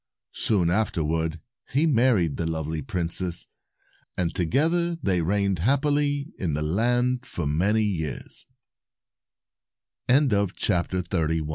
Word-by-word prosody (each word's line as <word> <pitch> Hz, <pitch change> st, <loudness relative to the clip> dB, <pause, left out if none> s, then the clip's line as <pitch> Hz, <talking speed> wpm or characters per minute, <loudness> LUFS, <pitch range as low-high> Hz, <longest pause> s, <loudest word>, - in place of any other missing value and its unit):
Soon 90 Hz, -6 st, +1 dB
afterward 80 Hz, -5 st, 0 dB, 0.3 s
he 145 Hz, +5 st, +3 dB
married 115 Hz, -, +3 dB
the 85 Hz, -, -2 dB
lovely 80 Hz, -1 st, -3 dB
princess, 85 Hz, +3 st, -2 dB, 0.7 s
and 85 Hz, -2 st, 0 dB
together 165 Hz, -, +1 dB
they 95 Hz, -, 0 dB
reigned 100 Hz, +1 st, +1 dB
hap 135 Hz, -, +2 dB
pily 145 Hz, 0 st, 0 dB
in 80 Hz, -6 st, -1 dB
the 75 Hz, -, -1 dB
land 120 Hz, +9 st, +1 dB
for 85 Hz, -9 st, -5 dB
many 95 Hz, +9 st, +2 dB
years. 80 Hz, -9 st, -3 dB, 1.6 s
267 100 Hz, -, +2 dB
A 90 Hz, -2 st, -1 dB, 0.2 s
MIRACLE. 80 Hz, -2 st, -2 dB
95 Hz, 115 wpm, -25 LUFS, 85-125 Hz, 1.6 s, he